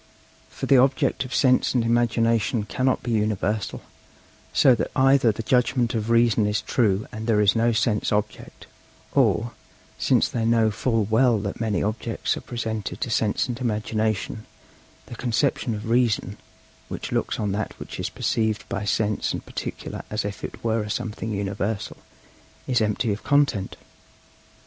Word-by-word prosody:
For - - -6
the 135 - +5
object 135 +1 +2
of 125 - -5
Sense 130 -1 +3
and 120 - +3
Imagination 115 -1 +1
cannot 130 +4 0
be 120 - -3
universal; 105 -1 -1 0.7
so 130 - +5
that 120 - -1
either 135 -3 +4
the 110 +2 -6
judgment 125 -1 +2
of 110 -1 -2
Reason 115 -2 +3
is 105 -1 0
true 105 -1 +1
and 110 +1 -6
there 110 -2 +3
is 105 0 +4
no 115 +1 +3
sense 110 -1 0
object, 105 0 -3 0.5
or, 115 +2 +2 0.5
since - - +3
they 115 - -2
know 115 -1 +3
full 115 +1 0
well 115 +3 +3
that 100 +2 -5
many 110 -3 0
objects 110 +2 -2
are - - -6
presented 110 -4 -4
to 120 - -2
Sense 110 +1 +1
and 120 -1 -4
Imagination, 110 -1 -2 0.6
the - - -10
conception 120 -1 0
of 105 +1 -6
Reason, 120 -2 +1 0.5
which - - -5
looks - - -1
on 105 -2 -1
that 100 +1 -3
which - - -8
is - - -2
perceived 110 -2 -1
by 105 - -3
Sense 105 +1 0
and - - -5
particular - - -6
as 105 0 -2
if 100 0 -6
it - - -7
were 115 -1 +1
a 105 - -5
something 110 +1 -3
"universal," 100 +1 -3 0.7
is 125 -3 +1
empty 105 +1 0
of 100 - -6
content. 140 -9 +1
110 Hz, 160 wpm, -24 LUFS, 105-120 Hz, 0.7 s, the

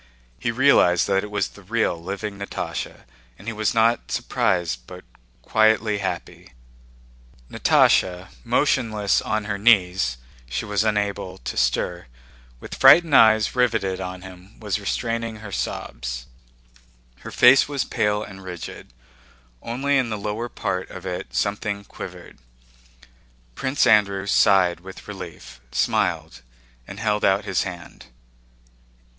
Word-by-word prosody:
He 120 - -2
realized 115 -8 +4
that 95 -1 +1
it 105 - -6
was 105 0 -1
the 100 - -16
real 110 -1 0
living 100 +4 -6
Natásha, 100 - -5 0.3
and - - -15
he 115 - -3
was 110 +1 -1
not 115 +1 +2
surprised 80 -10 -1
but - - -11 0.4
quietly 110 -1 +2
happy. 60 - -6 1.0
Natásha, 90 +1 +3
motionless 115 -5 +1
on 110 -1 -2
her 100 -1 -3
knees 95 - +3 0.3
(she - - -3
was 105 0 0
unable 105 -3 -1
to - - -6
stir), 65 +5 -1 0.5
with - - -10
frightened 165 -4 +6
eyes 110 0 +5
riveted 110 -7 0
on 90 0 -6
him, 95 +1 -14
was 105 -2 -2
restraining 115 +2 -2
her 105 -1 -10
sobs. - - -4 0.9
Her - - -9
face 125 +2 +6
was 140 -3 -1
pale 105 0 0
and 95 -2 -11
rigid. 90 -8 -9 0.7
Only 135 +4 0
in 125 -3 -1
the 110 - -3
lower 105 +4 -4
part 95 -4 -3
of 90 - -10
it 90 -1 -5
something 100 0 -2
quivered. - - -10 1.1
Prince 130 - 0
Andrew 100 -4 +3
sighed 95 -3 +3
with 95 +2 -12
relief, 65 -1 -10
smiled, - - -1 0.5
and 100 - -9
held 105 -1 0
out 95 +2 +2
his 95 - 0
hand. 90 -3 -8
100 Hz, 130 wpm, -23 LUFS, 95-110 Hz, 1.1 s, frightened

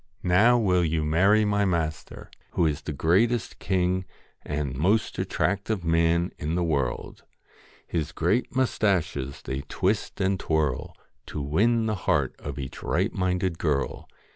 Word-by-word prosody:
Now 105 +8 +5
will 90 -6 +2
you 80 -1 0
marry 95 +8 +4
my 100 0 +2
master, 80 -5 -3 0.2
who 85 - +2
is 75 -1 0
the 75 - -5
greatest 100 - +1
king 95 0 0 0.4
and 70 -3 -3
most 95 +11 +1
attractive 100 0 -1
man 85 +1 +2
in 75 +3 -2
the 90 - +1
world 70 -7 -2 0.2
' - - -28
" - - -29
His 80 -2 -1
great 90 +11 0
moustaches 95 - 0
they 65 +1 -3
twist 100 +4 -1
and 95 -1 +1
twirl, 75 -6 -1 0.3
To - - -5
win 110 +11 +2
the 110 - 0 0.2
heart 70 -3 +2
of 70 -2 -6
each 65 -2 -6
right 95 +7 0
minded 90 -2 -1
girl. 75 -4 -1
85 Hz, 150 wpm, -26 LUFS, 75-100 Hz, 0.4 s, Now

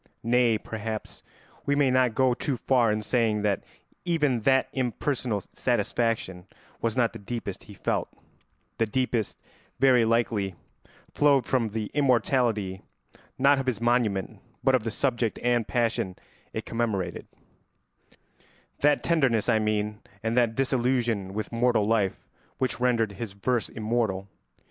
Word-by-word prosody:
Nay, 120 -1 +3
perhaps 110 0 -6 0.5
we 145 - +3
may 140 -2 +3
not 125 -3 +3
go 130 -1 +3
too 130 +2 -2
far 120 -3 +3
in 105 0 -1
saying 110 -2 +1
that 100 -2 0 0.4
even 150 -8 +1
that 130 +4 +3
impersonal 125 -4 -1
satisfaction 110 -6 -1 0.3
was 115 +1 -1
not 120 -2 +2
the - - -8
deepest 100 -2 -6
he 105 - -12
felt; - - -1 0.7
the 115 - +2
deepest, 120 -2 -1 0.4
very 130 -3 +5
likely, 110 -4 +1 0.6
flowed 140 -3 +4
from 125 -4 +1
the 105 0 -4
immortality, 120 -8 +1 0.6
not 140 +1 +4
of 135 - -4
his 120 -5 0
monument, 115 -5 0 0.2
but 135 - +4
of 125 -4 +2
the - - 0
subject 120 -2 0
and 120 -2 +2
passion 115 -6 0 0.4
it - - -5
commemorated; 105 -7 -2 1.5
that 145 0 +3
tenderness, 135 -10 +2
I 110 - +4
mean, 105 0 -1 0.2
and 115 +1 0
that 120 -2 +2
disillusion 125 -6 0
with 105 +1 -4
mortal 120 -2 +2
life 105 -3 0 0.3
which 130 -2 -1
rendered 120 -4 +2
his 100 0 -6
verse 115 +4 -1
immortal. 110 -4 -1
115 Hz, 135 wpm, -27 LUFS, 105-125 Hz, 1.5 s, very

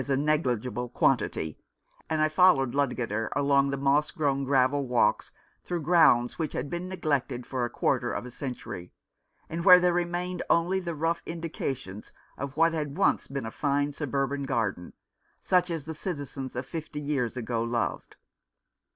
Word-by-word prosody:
a 135 - +2
neg 150 +2 +1
ligible 125 +1 -2
quantity, 80 -1 0 0.5
and 155 -1 +1
I - - +4
followed 155 -6 +4
Ludgater 115 -6 -1
along 140 -1 +3
the 140 - -2
moss 140 +2 +2
grown 140 -5 0
gravel 135 +1 +2
walks 125 -1 +2 0.3
through 175 -3 -3
grounds 145 -7 +4
which 155 -3 -2
had 145 - -4
been 175 +1 -4
neglected 140 -8 -1
for 130 -2 -2
a - - -4
quarter - - 0
of - - -4
a 125 - -8
century, 125 - -7 0.5
and 165 +1 -4
where 180 -1 +9
there 180 -1 +2
remained 175 +1 -2
only 175 +3 +3
the 170 -3 -4
rough 165 +3 0
indications 135 - -5 0.2
of 140 +1 -6
what 165 +1 +4
had 150 -2 -3
once 195 - +2
been 135 -3 -4
a 115 - -5
fine 145 +1 0
suburban 140 -1 -2
garden, 110 -9 -2 0.5
such 180 -1 +2
as 165 -4 -3
the 160 +3 -6
citizens 145 -6 -5
of 125 +2 -3
fifty 155 +1 -6
years 140 -5 -2
ago 115 -1 -2
loved. 115 0 -2
140 Hz, 165 wpm, -28 LUFS, 125-165 Hz, 0.5 s, where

